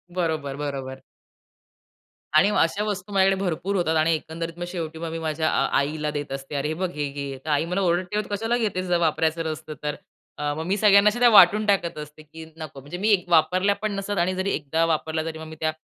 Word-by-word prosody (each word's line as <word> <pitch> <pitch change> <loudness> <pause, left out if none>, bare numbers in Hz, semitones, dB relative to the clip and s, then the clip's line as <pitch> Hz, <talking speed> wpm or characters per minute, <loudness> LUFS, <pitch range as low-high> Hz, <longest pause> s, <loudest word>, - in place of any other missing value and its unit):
बरोबर, 160 -6 -1
बरोबर. 135 -2 -5 1.4
आणि 175 +7 +6
अशा 195 +6 0
वस्तू 205 -1 -4
माझ्याकडे 195 0 +3
भरपूर 185 +3 -1
होतात 160 -3 +1
आणि 160 +1 +3
एकंदरीत 165 +2 -5
मग 175 - -3
शेवटी 165 -3 -5
मग 165 0 -4
मी 165 - -4
माझ्या 160 0 -1
आ - - +2
आईला 150 +2 -1
देत 145 -2 -5
असते. 135 +2 -6
"अरे, 140 +1 -1
हे 155 - -2
बघ 180 +2 -2
हे 145 -1 -2
घे." 140 -1 -6
आई 150 +1 +2
मला 180 +3 -2
ओरडते, 185 +3 0
"तू - - -13
कशाला 225 +4 0
घेतेस 200 -6 -1
जर 180 -1 +2
वापरायचं 160 0 +1
नसतं 155 0 -6
तर?" 150 0 -2 0.4
अ, 145 0 -1
मग 160 +2 -4
मी 190 +3 +1
सगळ्यांना 205 0 +6
अशा 210 +3 -1
त्या 245 - +7
वाटून 210 0 +7
टाकत 195 -5 +1
असते 150 +1 -9
की 160 +1 -11
नको 155 -4 -8
म्हणजे 145 +6 -8
मी 200 -2 +2
वापरल्या 185 +4 +3
पण 215 -1 -3
नसतात 195 0 -3
आणि 180 +2 +1
जरी 190 +1 -1
एकदा 160 +3 0
वापरल्या 160 0 -1
तरी 160 -1 -5
मग 160 - -8
मी 160 0 -10
त्या 155 0 0
165 Hz, 220 wpm, -24 LUFS, 155-190 Hz, 1.4 s, त्या